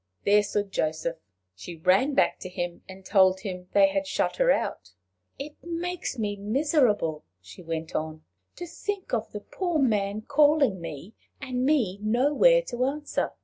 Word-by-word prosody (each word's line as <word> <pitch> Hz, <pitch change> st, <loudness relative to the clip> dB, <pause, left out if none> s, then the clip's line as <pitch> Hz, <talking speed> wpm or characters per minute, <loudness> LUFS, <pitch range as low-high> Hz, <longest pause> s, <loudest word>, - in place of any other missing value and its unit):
There 205 Hz, +1 st, +5 dB
stood 205 Hz, 0 st, -2 dB
Joseph! 160 Hz, +1 st, -2 dB, 0.4 s
She 170 Hz, -, -9 dB
ran 190 Hz, -, +2 dB
back -, -, +2 dB
to 185 Hz, -, -7 dB
him, 175 Hz, -1 st, -5 dB
and 190 Hz, 0 st, -11 dB
told 190 Hz, -2 st, +4 dB
him 180 Hz, -2 st, -6 dB
they 295 Hz, -1 st, +6 dB
had 290 Hz, 0 st, -2 dB
shut -, -, -1 dB
her -, -, +3 dB
out. 95 Hz, -, -1 dB, 0.4 s
"It 290 Hz, +2 st, -9 dB
makes 345 Hz, -3 st, -4 dB
me 210 Hz, -2 st, -2 dB
miserable," 210 Hz, -, +1 dB, 0.2 s
she 95 Hz, -, -13 dB
went 165 Hz, -1 st, -5 dB
on, 155 Hz, 0 st, -4 dB, 0.3 s
"to 350 Hz, -, -6 dB
think 385 Hz, +1 st, -5 dB
of 225 Hz, -2 st, -1 dB
the 210 Hz, -, -6 dB
poor 350 Hz, -, -2 dB
man 215 Hz, -6 st, 0 dB
calling 290 Hz, -, +3 dB
me, 165 Hz, +5 st, -8 dB, 0.3 s
and 255 Hz, -2 st, -3 dB
me 230 Hz, -11 st, +1 dB
nowhere 290 Hz, -, +4 dB
to 250 Hz, -, -3 dB
answer. 295 Hz, +2 st, -2 dB
215 Hz, 160 wpm, -26 LUFS, 185-290 Hz, 0.4 s, they